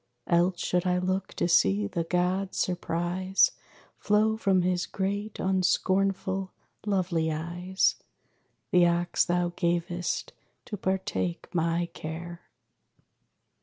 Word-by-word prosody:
Else 175 Hz, +1 st, +2 dB
should 180 Hz, 0 st, +1 dB
I 180 Hz, 0 st, +2 dB
look 185 Hz, +1 st, -2 dB
to -, -, 0 dB
see 105 Hz, -, +3 dB
the 165 Hz, +12 st, -2 dB
god's 180 Hz, +3 st, 0 dB
surprise 180 Hz, +2 st, +1 dB, 0.5 s
Flow 215 Hz, +1 st, +2 dB
from 195 Hz, -4 st, +2 dB
his 180 Hz, 0 st, 0 dB
great 200 Hz, +2 st, -3 dB
unscornful, 190 Hz, 0 st, +1 dB, 0.4 s
lovely 175 Hz, -5 st, +1 dB
eyes 175 Hz, +4 st, 0 dB, 0.7 s
The 175 Hz, -1 st, +5 dB
ox 170 Hz, 0 st, +1 dB
thou 175 Hz, 0 st, +1 dB
gavest 175 Hz, 0 st, -1 dB, 0.3 s
to 215 Hz, -, -5 dB
partake 190 Hz, -2 st, -2 dB
my 170 Hz, 0 st, +1 dB
care. 170 Hz, +2 st, -7 dB
180 Hz, 105 wpm, -28 LUFS, 170-190 Hz, 0.7 s, The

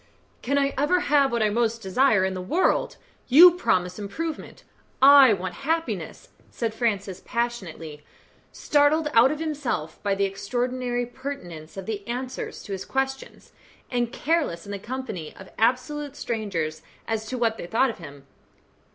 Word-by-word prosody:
"Can 280 Hz, +3 st, 0 dB
I 275 Hz, 0 st, +1 dB
ever 355 Hz, +6 st, +2 dB
have 285 Hz, -5 st, +3 dB
what 235 Hz, -2 st, +1 dB
I 210 Hz, -, +2 dB
most 230 Hz, 0 st, 0 dB
desire 205 Hz, 0 st, +3 dB
in 190 Hz, -, -1 dB
the 185 Hz, -, -5 dB
world? 325 Hz, -, +1 dB, 0.3 s
You 335 Hz, +8 st, +9 dB
promise 185 Hz, -, 0 dB
improvement 310 Hz, +11 st, -6 dB, 0.4 s
I 275 Hz, -2 st, +8 dB
want 185 Hz, -2 st, -2 dB
happiness," 325 Hz, +3 st, -3 dB, 0.2 s
said 230 Hz, -2 st, -3 dB
Francis, 200 Hz, -5 st, -2 dB
passionately, 175 Hz, -11 st, -4 dB, 0.5 s
startled 300 Hz, +1 st, +2 dB
out 235 Hz, +4 st, +6 dB
of 305 Hz, -, -3 dB
himself 285 Hz, -, -3 dB
by 200 Hz, -1 st, 0 dB
the 200 Hz, 0 st, +1 dB
extraordinary 245 Hz, +5 st, -2 dB
pertinence 190 Hz, -, -8 dB
of 190 Hz, -, -6 dB
the 215 Hz, -2 st, -4 dB
answers 250 Hz, +2 st, -5 dB
to -, -, -9 dB
his 190 Hz, -1 st, -4 dB
questions, 270 Hz, 0 st, -4 dB, 0.4 s
and 240 Hz, -2 st, 0 dB
careless 290 Hz, -, -1 dB
in 200 Hz, -, -8 dB
the 200 Hz, -, -4 dB
company 215 Hz, -8 st, -6 dB
of 190 Hz, -, -13 dB
absolute 270 Hz, +5 st, 0 dB
strangers 190 Hz, -, -3 dB, 0.3 s
as 220 Hz, -1 st, -2 dB
to 255 Hz, -, -4 dB
what 225 Hz, -2 st, 0 dB
they -, -, -6 dB
thought 235 Hz, +6 st, +2 dB
of 220 Hz, -, -13 dB
him. 140 Hz, -4 st, -11 dB
235 Hz, 155 wpm, -25 LUFS, 195-275 Hz, 0.5 s, You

